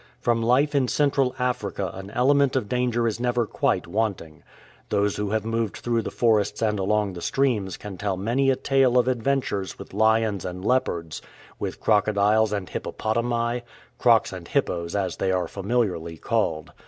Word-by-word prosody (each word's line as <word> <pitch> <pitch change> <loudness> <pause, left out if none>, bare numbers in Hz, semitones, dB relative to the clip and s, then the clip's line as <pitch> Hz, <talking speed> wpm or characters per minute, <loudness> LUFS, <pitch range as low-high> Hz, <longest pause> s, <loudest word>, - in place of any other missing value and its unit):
From 115 -1 +1
life 130 +6 +3
in 135 -3 +2
Central 140 -2 +1
Africa 110 -6 -2
an 95 +1 -8
element 135 +4 +3
of 125 -6 0
danger 120 0 0
is 115 - -2
never 120 -1 +1
quite - - 0
want 110 -4 -1
ing. 80 -2 -14 0.5
Those 100 0 +1
who 105 -1 -2
have 110 +1 -1
moved 115 -2 -1
through 120 -1 0
the - - -4
forests 105 -3 +1
and 105 -2 +1
along 105 0 0
the 85 - -8
streams 115 -8 0
can 95 -3 -9
tell 100 -2 -1
many 120 +8 +1
a 135 - +4
tale 135 -2 +2
of 125 0 +3
adventures 125 -6 -1
with - - -11
lions 110 -1 +2
and 90 +1 -6
leopards, 85 -11 0 0.4
with - - -4
crocodiles 105 0 +3
and 100 -3 -2
hippopotami 120 +2 -1 0.2
— - - -29
crocs - - +4
and - - -8
hippos 85 +1 -1
as 95 -4 -1
they 95 - 0
are 90 -1 0
familiarly 95 -6 -2
called. 80 -7 -1
110 Hz, 175 wpm, -24 LUFS, 100-125 Hz, 0.5 s, a